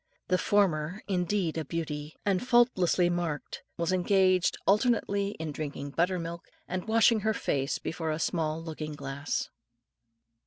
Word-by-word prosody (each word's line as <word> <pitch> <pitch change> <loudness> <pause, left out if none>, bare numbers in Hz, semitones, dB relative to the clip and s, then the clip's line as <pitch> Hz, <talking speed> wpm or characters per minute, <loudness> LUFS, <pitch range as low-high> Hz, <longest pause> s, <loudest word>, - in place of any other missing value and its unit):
The 185 0 +3
former, 185 -3 +1
indeed 180 -3 0
a - - -2
beauty, 150 -1 -4
and 195 -2 +2
faultlessly 240 -8 +3
marked, 175 -4 -3 0.2
was 170 +2 0
engaged 185 0 +3
alternately 200 -2 +2
in 160 -1 -3
drinking 145 -1 -5
butter 180 +5 +1
milk, 170 0 -5 0.3
and 185 +2 -4
washing 225 0 +4
her 220 +1 0
face 135 -6 -1
before 160 0 -4
a 155 - 0
small 160 -1 -1
looking 155 -2 -5
glass. 140 0 -3
175 Hz, 140 wpm, -29 LUFS, 155-200 Hz, 0.3 s, washing